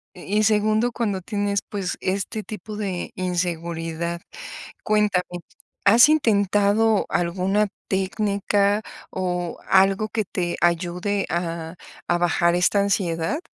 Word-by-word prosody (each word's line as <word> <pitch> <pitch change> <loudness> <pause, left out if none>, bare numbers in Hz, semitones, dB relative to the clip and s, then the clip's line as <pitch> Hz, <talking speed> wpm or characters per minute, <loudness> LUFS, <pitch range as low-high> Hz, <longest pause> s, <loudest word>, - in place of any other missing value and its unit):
Y 200 +4 -1
y - - +3
segundo, 215 +2 +2
cuando 205 -6 -2
tienes, 200 0 -1
pues, 195 -4 -4
este 195 +3 -2
tipo 210 0 -8
de 190 -4 -3
inseguridad. 170 -1 -3 0.6
Cuéntame, 210 -4 +2 0.6
¿has 230 +8 +7
intentado 210 -4 +3
alguna 185 +4 +1 0.2
técnica 200 +1 +1 0.3
o 180 -2 -3
algo 195 +3 +3
que 220 -2 -1
te 175 -1 -3
ayude 180 +4 0
a 165 -1 -3 0.3
a 175 - +2
bajar 175 0 +2
esta 185 +3 +3
ansiedad? 190 - 0
195 Hz, 110 wpm, -23 LUFS, 175-210 Hz, 0.6 s, has